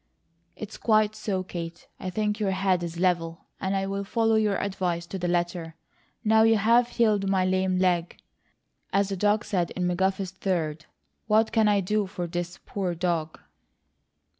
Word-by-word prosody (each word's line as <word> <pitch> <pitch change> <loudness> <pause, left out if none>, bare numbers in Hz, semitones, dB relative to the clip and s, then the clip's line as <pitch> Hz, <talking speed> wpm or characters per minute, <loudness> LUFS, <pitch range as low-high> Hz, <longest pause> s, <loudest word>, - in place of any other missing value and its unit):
"It's 215 0 -8
quite 215 -1 +3
so. 200 -3 -2
Kate, 170 -2 -7
I 185 - -4
think 210 +2 -1
your 205 -2 +1
head 190 -1 +1
is 170 -1 -5
level, 170 -2 0
and 190 +1 -1
I'll 195 +1 -1
follow 225 +2 +1
your 215 -2 +2
advice 180 -4 -2
to 190 +2 -6
the 175 - -1
letter. 175 -2 -1 0.5
Now 220 0 +5
you 225 0 +5
have 235 +4 +4
'healed 215 -5 +1
my 190 -1 +2
lame 185 0 +1
leg,' 180 -2 +1 0.7
as 200 0 +2
the 195 - -2
dog 210 +3 +1
said 175 -4 0
in 185 - -2
McGuffey's 190 +1 0
Third, 165 -5 -2 0.4
what 220 +1 +3
can 220 -2 +3
I 205 -1 +3
do 210 +2 0
for 185 -2 -4
THIS 175 +1 -4
poor 185 -4 -2
dog?" 165 -2 -2
190 Hz, 165 wpm, -26 LUFS, 175-210 Hz, 0.7 s, Now